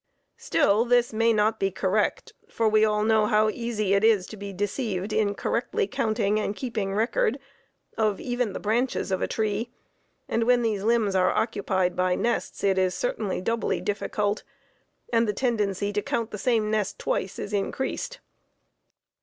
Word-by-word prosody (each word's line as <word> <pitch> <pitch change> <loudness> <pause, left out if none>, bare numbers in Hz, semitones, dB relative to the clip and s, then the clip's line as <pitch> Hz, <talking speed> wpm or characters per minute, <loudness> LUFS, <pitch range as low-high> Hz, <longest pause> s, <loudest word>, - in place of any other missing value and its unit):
Still 205 +3 +2
this 245 -1 +2
may 230 +1 +3
not 215 0 +2
be 195 - +1
correct, 195 +2 -1 0.2
for 225 - 0
we 215 0 +4
all 210 -1 +2
know 220 -1 +3
how 215 0 +3
easy 215 -3 -1
it 200 +1 +3
is 215 -4 +4
to 220 - -9
be 200 -1 -7
deceived 200 0 -2
in 205 -2 +1
correctly 235 +2 -1
counting 215 0 0
and 210 -1 -2
keeping 210 -6 -3
record 435 - +1 0.6
of 215 -3 +1
even 245 -3 -1
the - - -4
branches 225 0 0
of 190 - 0
a - - +1
tree, 220 +1 -1 0.6
and 230 0 0
when 245 0 +4
these 215 -3 0
limbs 220 -2 +2
are 185 -1 +3
occupied 190 -5 0
by 180 0 +1
nests 235 +4 -2
it 195 -1 +3
is 185 -1 +1
certainly - - -2
doubly 230 +4 -1
difficult, 205 0 -1 0.7
and 230 0 +3
the 210 - 0
tendency 205 -4 -1
to 210 - 0
count 225 +2 -2
the 210 - -6
same 220 -2 +1
nests 215 -2 0
twice 190 - -2
is 205 - -5
increased. 265 - -2
215 Hz, 170 wpm, -26 LUFS, 200-230 Hz, 0.7 s, we